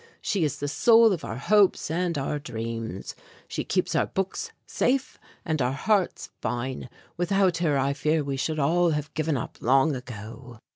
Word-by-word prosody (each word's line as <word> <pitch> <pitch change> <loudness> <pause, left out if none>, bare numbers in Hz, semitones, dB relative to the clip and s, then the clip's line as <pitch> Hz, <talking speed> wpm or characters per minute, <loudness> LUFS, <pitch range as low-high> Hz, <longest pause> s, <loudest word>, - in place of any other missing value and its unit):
She 195 -5 0
is 145 -2 -1
the 145 - -3
soul 225 +8 +5
of 175 - -4
our 110 - -4
hopes 195 +2 +3
and 170 -1 0
our 145 +2 -2
dreams. 115 -6 -5 0.3
She - - -3
keeps - - 0
our - - +2
books 195 - -3
safe 265 +1 0 0.3
and 155 -4 0
our 125 +1 +1
hearts 180 +1 0
fine. 125 +1 -3 0.3
Without 185 0 +2
her 160 -5 +1
I 135 +1 +1
fear 150 +2 +1
we 140 -1 -3
should 155 +4 -2
all 170 +4 +3
have 150 -2 -2
given 155 -2 0
up 120 - -6
long 135 +4 +3
ago." 120 0 -9
150 Hz, 175 wpm, -26 LUFS, 130-175 Hz, 0.3 s, soul